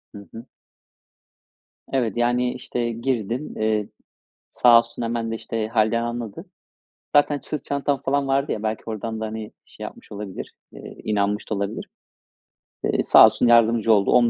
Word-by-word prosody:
Hı 100 Hz, -2 st, -11 dB
hı. 115 Hz, +2 st, -9 dB, 1.5 s
Evet, 120 Hz, -4 st, 0 dB
yani, 120 Hz, +1 st, +1 dB
işte, 120 Hz, -1 st, -3 dB
girdim. 120 Hz, +2 st, -3 dB
Eee, 110 Hz, -1 st, 0 dB, 0.6 s
sağ 120 Hz, -1 st, +6 dB
olsun 115 Hz, 0 st, -6 dB
hemen 115 Hz, -1 st, -2 dB
de, -, -, -2 dB
işte, 110 Hz, -1 st, -3 dB
hâlden 110 Hz, +1 st, +1 dB
anladı. 120 Hz, -3 st, -5 dB, 0.7 s
Zaten 145 Hz, 0 st, +4 dB
sırt 150 Hz, -3 st, -5 dB
çantam, 140 Hz, -1 st, -1 dB
falan, 140 Hz, 0 st, 0 dB
vardı 135 Hz, +1 st, +1 dB
ya 105 Hz, -, -3 dB
belki 110 Hz, 0 st, -2 dB
ordan 110 Hz, 0 st, -4 dB
da, -, -, -1 dB
hani, 110 Hz, 0 st, -6 dB
şey, -, -, -12 dB
yapmış -, -, -10 dB
olabilir, 100 Hz, -2 st, -7 dB, 0.2 s
eee, -, -, -11 dB
inanmış 105 Hz, -1 st, -1 dB
da 110 Hz, -, -1 dB
olabilir. 100 Hz, 0 st, -4 dB, 0.9 s
Eee, -, -, +1 dB
sağ -, -, +8 dB
olsun 110 Hz, +2 st, +2 dB
yardımcı 115 Hz, -1 st, +5 dB
oldu 100 Hz, -2 st, +3 dB
10 120 Hz, -1 st, +5 dB
115 Hz, 155 wpm, -23 LUFS, 110-120 Hz, 1.5 s, sağ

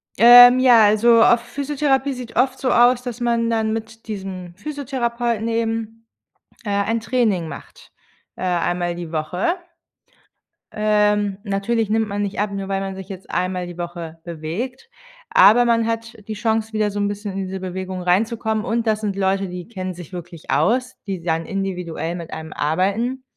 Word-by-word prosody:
Ähm, 245 Hz, +3 st, +9 dB
ja, 245 Hz, -4 st, +6 dB
also 225 Hz, +3 st, +5 dB
auf 240 Hz, -1 st, +5 dB
Physiotherapie 280 Hz, +1 st, -1 dB
sieht 250 Hz, -2 st, -9 dB
oft 260 Hz, +1 st, +2 dB
so 255 Hz, -, 0 dB
aus, 245 Hz, +1 st, +4 dB
dass 245 Hz, -1 st, -6 dB
man 235 Hz, -1 st, +1 dB
dann 220 Hz, -1 st, 0 dB
mit 225 Hz, 0 st, -7 dB
diesem 190 Hz, -4 st, -6 dB
Physiotherapeuten 240 Hz, -3 st, -2 dB
eben, 225 Hz, 0 st, -3 dB, 0.6 s
äh, -, -, -3 dB
ein 200 Hz, +3 st, 0 dB
Training 225 Hz, -7 st, 0 dB
macht, -, -, -11 dB, 0.4 s
äh, -, -, -11 dB
einmal 175 Hz, -1 st, 0 dB
die 170 Hz, -2 st, -7 dB
Woche. 170 Hz, -, -1 dB, 1.2 s
Ähm, 210 Hz, -1 st, +1 dB
natürlich 210 Hz, +2 st, -1 dB
nimmt 220 Hz, 0 st, +1 dB
man 205 Hz, 0 st, -3 dB
nicht 200 Hz, -1 st, -3 dB
ab, 205 Hz, 0 st, 0 dB
nur 195 Hz, -1 st, -4 dB
weil 195 Hz, 0 st, -1 dB
man 195 Hz, 0 st, -4 dB
sich 190 Hz, -1 st, -9 dB
jetzt 190 Hz, -1 st, -9 dB
einmal 180 Hz, 0 st, -1 dB
die 175 Hz, -1 st, -9 dB
Woche 170 Hz, -2 st, -6 dB
bewegt, 175 Hz, -, -6 dB, 0.4 s
aber 220 Hz, +6 st, +6 dB
man 230 Hz, -1 st, +2 dB
hat 230 Hz, 0 st, -3 dB
die 220 Hz, -, -3 dB
Chance, 220 Hz, +1 st, -1 dB
wieder 215 Hz, -1 st, 0 dB
so 205 Hz, -, -4 dB
'n 205 Hz, -, +1 dB
bisschen 205 Hz, 0 st, -5 dB
in 195 Hz, 0 st, -3 dB
diese 190 Hz, +1 st, -5 dB
Bewegung 185 Hz, 0 st, -5 dB
reinzukommen 220 Hz, +4 st, 0 dB
und 230 Hz, 0 st, -1 dB
das 215 Hz, -1 st, +1 dB
sind 205 Hz, -3 st, -2 dB
Leute, 195 Hz, 0 st, 0 dB
die 180 Hz, -1 st, -7 dB
kennen 185 Hz, -5 st, -5 dB
sich 175 Hz, 0 st, -11 dB
wirklich 175 Hz, -2 st, -9 dB
aus, 245 Hz, -, +1 dB
die 190 Hz, -3 st, -4 dB
dann 165 Hz, -1 st, -1 dB
individuell 180 Hz, -4 st, -3 dB
mit 170 Hz, -2 st, -8 dB
einem 160 Hz, 0 st, -7 dB
arbeiten. 200 Hz, -, -1 dB
210 Hz, 170 wpm, -21 LUFS, 185-235 Hz, 1.2 s, Ähm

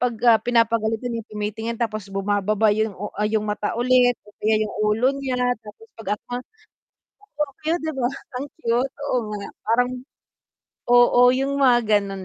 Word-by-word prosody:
'pag, 245 Hz, -2 st, 0 dB
ah, 225 Hz, -1 st, +7 dB
pinapagalitan 230 Hz, 0 st, +1 dB
'yong 225 Hz, -1 st, -7 dB
tumitingin 215 Hz, +2 st, -4 dB
tapos 215 Hz, -4 st, -2 dB
bumababa 205 Hz, +2 st, +1 dB
'yong 215 Hz, -1 st, -1 dB
u 205 Hz, +2 st, -5 dB
ah, 210 Hz, 0 st, +1 dB
'yong 215 Hz, -1 st, 0 dB
mata 210 Hz, 0 st, -2 dB
ulit 245 Hz, 0 st, +4 dB
o -, -, -15 dB
kaya 215 Hz, +1 st, +2 dB
'yong 210 Hz, -, -6 dB
ulo 215 Hz, +4 st, +2 dB
niya 260 Hz, -2 st, -2 dB, 0.2 s
tapos 220 Hz, -, -14 dB
'pag 225 Hz, -, -8 dB
at -, -, -35 dB
ma 245 Hz, -, -1 dB, 1.0 s
oo, 295 Hz, -2 st, 0 dB
kaya 320 Hz, +2 st, +1 dB
'di 315 Hz, 0 st, -3 dB
ba, 245 Hz, -2 st, +1 dB, 0.3 s
ang -, -, -3 dB, 0.2 s
cute. 240 Hz, +3 st, 0 dB, 0.2 s
Oo 250 Hz, -, +3 dB, 0.2 s
nga 200 Hz, -, -7 dB, 0.2 s
parang 245 Hz, +3 st, +2 dB, 1.0 s
oo, 245 Hz, 0 st, +6 dB
'yong 275 Hz, +1 st, -1 dB
mga 250 Hz, -3 st, +6 dB, 0.2 s
gano'n 195 Hz, -2 st, -6 dB
225 Hz, 170 wpm, -23 LUFS, 210-245 Hz, 1.0 s, ah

